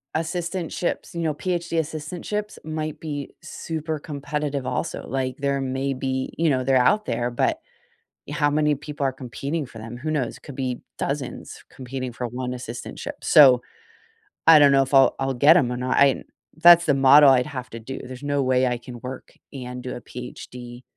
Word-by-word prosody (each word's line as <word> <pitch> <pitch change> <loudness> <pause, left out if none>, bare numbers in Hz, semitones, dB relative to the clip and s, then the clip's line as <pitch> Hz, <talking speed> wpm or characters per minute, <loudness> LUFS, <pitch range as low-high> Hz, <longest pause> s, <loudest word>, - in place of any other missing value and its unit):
assistantships, 170 +1 -3
you 170 - -3
know, 160 -2 0
PhD 170 +1 -2
assistantships 165 +7 -4
might 155 -1 -4
be 145 -3 -5
super 160 -1 -5
competitive 145 -1 -4
also. 165 +5 -3
Like, 130 -1 -2
there 140 -1 -1
may 135 +1 -2
be 130 0 -3
you 165 0 +2
know, 130 -3 +1
they're 135 +1 +2
out 210 +12 +3
there, 120 0 -1
but 120 - 0 0.7
y 145 - -5
how 145 -1 +2
many 150 0 +2
people 145 0 -5
are 135 - +1
competing 140 +5 -4
for 115 - -12
them, 115 +2 -8
who 150 +6 -4
knows? 140 -6 -2
Could 140 - -11
be 130 -2 -3 0.2
dozens 140 -3 -4
competing 130 -1 -5
for 125 +1 -4
one 125 +1 -4
assistantship. 125 -1 -7
So 130 -5 +7 0.9
I 160 -2 +9
don't 145 -1 +6
know 135 0 +5
if 135 - -8
I'll 135 -1 +6
I'll 135 0 0
get 145 +7 +6
'em 125 -7 +2
or 125 - -3
not. 125 +1 -1
I 140 -2 +4 0.3
that's 170 +1 +7
the 145 - +3
model 135 +2 +7
I'd 125 -2 +4
have 130 -4 -6
to 115 - -7
do. 130 +4 -7
There's 130 +2 -9
no 145 0 0
way 130 -1 +2
I 125 -1 -1
can 120 0 -10
work 130 +1 -8 0.2
and 125 -2 -7
do 125 - -5
a - - -8
PhD 125 0 -9
135 Hz, 190 wpm, -23 LUFS, 125-155 Hz, 0.9 s, I